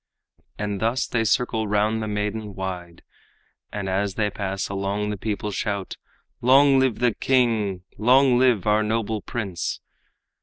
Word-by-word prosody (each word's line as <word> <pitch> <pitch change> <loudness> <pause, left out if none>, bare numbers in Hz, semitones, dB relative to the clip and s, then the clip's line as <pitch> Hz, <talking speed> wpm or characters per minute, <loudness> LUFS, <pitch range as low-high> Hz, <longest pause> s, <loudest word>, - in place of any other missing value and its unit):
And 105 -1 -3
thus 115 +4 +1
they 115 -2 0
circle 110 0 +1
round 105 +2 +1
the 110 - -3
maidan 105 0 -3
wide, 90 -3 -6 0.7
And 105 -2 -4
as 95 +1 -1
they 105 -2 0
pass 95 -1 -3
along 100 +1 -2
the - - -2
people 105 +1 -3
shout, 100 -2 -3 0.4
"Long 135 +2 +6
live 130 -4 +2
the 120 -2 +2
king! 110 -8 +1 0.2
long 125 +2 +5
live 125 -7 +3
our 105 0 +3
noble 110 0 -1
prince!" 100 -7 -4
105 Hz, 145 wpm, -24 LUFS, 100-115 Hz, 0.7 s, Long